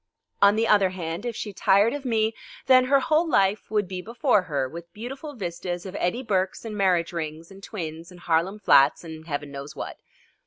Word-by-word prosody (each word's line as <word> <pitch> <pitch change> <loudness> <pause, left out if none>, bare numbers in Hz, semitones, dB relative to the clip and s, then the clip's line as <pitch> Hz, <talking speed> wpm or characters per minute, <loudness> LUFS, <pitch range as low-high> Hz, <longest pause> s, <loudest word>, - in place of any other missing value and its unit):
On 200 +1 +6
the 225 +1 +1
other 200 -3 +4
hand, 175 +3 -5
if 235 - -4
she 210 - -5
tired 200 +5 +3
of 290 -1 -6
me, 220 -2 +1 0.3
then 255 -1 +6
her 275 +1 +4
whole 315 +5 +2
life 200 -5 +2
would 210 -2 0
be 185 0 -5
before 230 +1 +2
her 145 -7 -2
with 170 +5 -10
beautiful 270 +7 -7
vistas 175 -3 -5
of 190 0 -7
Eddie 205 +9 -1
Burkes 190 -2 -1
and 215 -2 -5
marriage 180 -4 +1
rings 160 +1 -5
and 195 0 -13
twins 165 -5 -7
and 180 -1 -14
Harlem 170 +4 0
flats 145 -9 +4
and 160 -1 -9
Heaven 145 -2 -4
knows 140 +1 -8
what. - - -6
190 Hz, 200 wpm, -25 LUFS, 170-225 Hz, 0.3 s, On